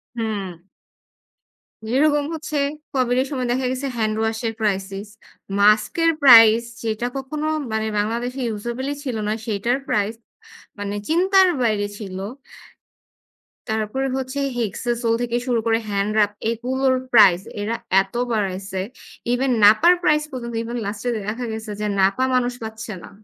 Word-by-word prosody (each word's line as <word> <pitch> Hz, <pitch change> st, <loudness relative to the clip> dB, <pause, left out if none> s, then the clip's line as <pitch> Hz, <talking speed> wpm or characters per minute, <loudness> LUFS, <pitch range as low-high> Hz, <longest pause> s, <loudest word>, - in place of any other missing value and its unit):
হুম। 210 Hz, -5 st, -3 dB, 1.3 s
যেরকম 290 Hz, +4 st, +2 dB
হচ্ছে, 305 Hz, -2 st, -3 dB, 0.4 s
COVID 250 Hz, -1 st, +1 dB
এর 265 Hz, -, -2 dB
সময় 255 Hz, -3 st, -2 dB
দেখা 255 Hz, +1 st, 0 dB
গেছে 265 Hz, +2 st, -3 dB
হ্যান্ড 215 Hz, -1 st, 0 dB
ওয়াশ 220 Hz, 0 st, -1 dB
এর 225 Hz, -, -2 dB
crisis 195 Hz, 0 st, -2 dB, 0.5 s
মাস্ক 215 Hz, +1 st, +4 dB
এর 330 Hz, -, +5 dB
প্রাইস 230 Hz, -3 st, +8 dB, 0.2 s
যেটা 225 Hz, +1 st, -1 dB
কখনো 300 Hz, +3 st, -4 dB, 0.2 s
মানে 220 Hz, 0 st, -1 dB
বাংলাদেশে 240 Hz, +5 st, -2 dB, 0.2 s
usable 240 Hz, +5 st, -4 dB
ই -, -, -8 dB
ছিল 255 Hz, -4 st, -3 dB
না 215 Hz, -, +1 dB
সেইটার 230 Hz, +4 st, 0 dB
প্রাইস, 210 Hz, +1 st, 0 dB, 0.7 s
মানে 205 Hz, 0 st, -3 dB
চিন্তার 375 Hz, +3 st, +5 dB
বাইরে 210 Hz, -3 st, +1 dB
ছিল। 190 Hz, -3 st, -7 dB, 1.5 s
তারপরে 220 Hz, +5 st, -1 dB
হচ্ছে 265 Hz, +2 st, -4 dB, 0.2 s
হেক্সাসোল 235 Hz, +1 st, -1 dB
থেকে 240 Hz, 0 st, -1 dB
শুরু 240 Hz, -2 st, +2 dB
করে 225 Hz, 0 st, +2 dB
হ্যান্ড 200 Hz, +1 st, 0 dB
রাব 205 Hz, -1 st, +3 dB, 0.2 s
এগুলোর 260 Hz, +3 st, 0 dB, 0.2 s
প্রাইস, 195 Hz, -6 st, +7 dB, 0.2 s
এরা 225 Hz, +3 st, -1 dB, 0.3 s
এত 195 Hz, 0 st, -9 dB, 0.2 s
বাড়াইছে! 195 Hz, -2 st, -2 dB, 0.5 s
ইভেন 260 Hz, +1 st, +1 dB
নাপার 220 Hz, +13 st, +7 dB
প্রাইস 300 Hz, -3 st, +3 dB
পর্যন্ত 235 Hz, -2 st, -6 dB
ইভেন 235 Hz, +1 st, -5 dB
লাস্ট 205 Hz, +1 st, -5 dB
এ -, -, +1 dB, 0.2 s
দেখা 240 Hz, +3 st, -4 dB
গেছে 220 Hz, -1 st, -6 dB
যে 210 Hz, -, 0 dB
নাপা 195 Hz, +6 st, +3 dB
মানুষ 250 Hz, -1 st, +1 dB
পাচ্ছে 220 Hz, -1 st, -6 dB
না। -, -, -10 dB
230 Hz, 145 wpm, -22 LUFS, 210-255 Hz, 1.5 s, প্রাইস